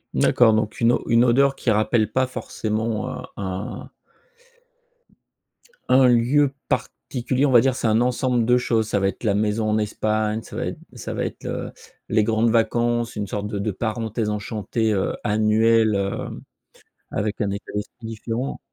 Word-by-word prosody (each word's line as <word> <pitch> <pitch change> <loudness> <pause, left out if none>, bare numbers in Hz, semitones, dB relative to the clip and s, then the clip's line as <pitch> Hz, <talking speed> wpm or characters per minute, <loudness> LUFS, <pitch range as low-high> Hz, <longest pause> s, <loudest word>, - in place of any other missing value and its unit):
D'accord, 115 -3 +4
donc 110 +1 -2
une 115 +1 +5
o - - -1
une 115 +1 +4
odeur 135 +3 +3
qui 120 - -2
rappelle 110 0 +2
pas 130 +2 +2
forcément 110 -3 -3
heu - - -5 0.2
un 95 +1 -5 2.0
un 130 0 +6
lieu 130 +4 +3
particulier, 130 0 -1
on 135 - +1
va 120 -2 +7
dire 130 -1 +2
c'est 115 - -1
un 110 +1 +3
ensemble 125 -1 +1
de 125 +1 +4
choses, 115 -3 0
ça 100 - 0
va 95 - +1
être 100 - -5
la 105 -3 +2
maison 110 +1 0
en 110 - +2
Espagne, 110 +1 -1
ça - - -11
va - - -2
être - - -5 0.2
ça - - -6
va - - -1
être, - - -7
heu, - - -4 0.4
les 110 0 +3
grandes 110 +1 +2
vacances, 120 +1 +1
une 105 - -2
sorte 100 +1 -4
de 105 -1 -4
de 105 +1 -1
parenthèse 110 +1 -2
enchantée, 105 +1 -1
heu, 95 - -1
annuelle, 110 +1 +3
heu 100 0 -3 0.7
avec 105 +1 -2
un 100 - 0
état 100 +1 -6
d'esprit 105 +3 -6
différent. 115 +4 -4
110 Hz, 175 wpm, -23 LUFS, 105-120 Hz, 2.0 s, va